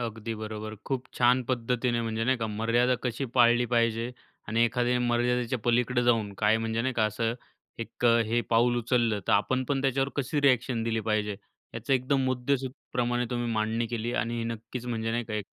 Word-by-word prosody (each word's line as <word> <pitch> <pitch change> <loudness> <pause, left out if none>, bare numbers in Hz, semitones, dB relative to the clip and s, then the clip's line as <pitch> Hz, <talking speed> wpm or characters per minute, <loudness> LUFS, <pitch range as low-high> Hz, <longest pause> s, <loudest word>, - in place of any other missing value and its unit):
अगदी. 115 -1 -4 0.5
खूप 130 -2 -2
छान 125 +1 +3
पद्धतीने 120 0 0
म्हणजे 115 0 -2
नाही 130 +2 +2
का, 115 -2 -2
मर्यादा 115 +4 +1
कशी 125 +2 -2
पाळली 120 -1 +5
पाहिजे 115 0 +1 0.4
आणि 115 +2 +3
एखाद्या 125 +1 +1
मर्यादेच्या 125 +1 +1
पलीकडं 120 +1 +2
जाऊन, 115 -4 +2
काय 105 +1 +3
म्हणजे 115 0 -1
नाही 130 +1 -1
का, 110 - +2
असं 115 +2 -1 0.5
एक 115 - -6
अ, 115 -1 +5
हे 115 +2 +1
पाऊल 120 +1 +3
उचललं 120 -3 +1
तर - - +4
आपण 130 +6 +2
पण 140 -1 +1
त्याच्यावर 135 0 +1
कशी 140 +1 -1
रिएक्शन 130 -3 +2
दिली 115 0 -1
पाहिजे. 105 -2 -1 0.4
याचं 115 +3 -2
एकदम 135 +1 +2
मुद्देसुधप्रमाणे 125 -1 -1
तुम्ही 120 -1 -2
मांडणी 110 +1 0
केली 115 +1 -3
आणि 115 0 -1
हे 115 - -2
नक्कीच 115 +2 -6
म्हणजे 115 -2 -2
नाही 120 +1 -1
का, 110 - -6
एक 105 -1 -2
120 Hz, 180 wpm, -28 LUFS, 115-125 Hz, 0.5 s, पाळली